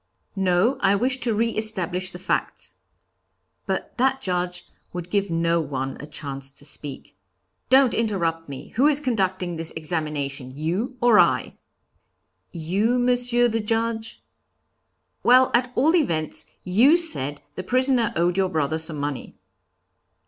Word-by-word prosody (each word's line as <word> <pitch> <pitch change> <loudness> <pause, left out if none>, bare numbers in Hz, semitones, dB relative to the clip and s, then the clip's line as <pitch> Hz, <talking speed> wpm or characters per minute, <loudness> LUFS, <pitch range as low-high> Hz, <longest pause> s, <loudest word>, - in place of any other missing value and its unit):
'No, 190 +6 +2
I 200 0 +4
wish 255 +5 0
to 240 -1 -1
re 230 +2 +1
establish 185 -5 -1
the - - -9
facts.' 180 - -3 0.9
But - - -3
that 265 +1 +2
Judge 180 -4 -2 0.3
would 175 0 -6
give 200 -1 +1
no 165 0 +1
one 135 -3 -4
a 145 - -8
chance 140 -2 -6
to 140 - -10
speak. 145 -2 -8 0.5
'Don't 265 -1 +5
interrupt 170 -8 -1
me. 135 -2 -8
Who 265 +6 +2
is 295 -1 +3
conducting 190 - -1
this 165 0 -4
examination, 150 -5 -4
you 190 - -2
or 235 -3 +6
I?' - - +2 1.0
'You, 195 +9 0
Monsieur 245 -1 +2
the 225 -1 -1
Judge?' 225 +1 -2 1.0
'Well, 255 +1 +5
at 245 +1 +2
all 315 +7 +3
events, 165 - 0 0.2
you 235 - +5
said 145 - 0
the - - -5
prisoner 255 +2 +1
owed 175 +2 +1
your 190 -1 +2
brother 155 -2 -1
some 160 -1 +1
money.' 145 -2 -4
185 Hz, 140 wpm, -23 LUFS, 160-240 Hz, 1.0 s, or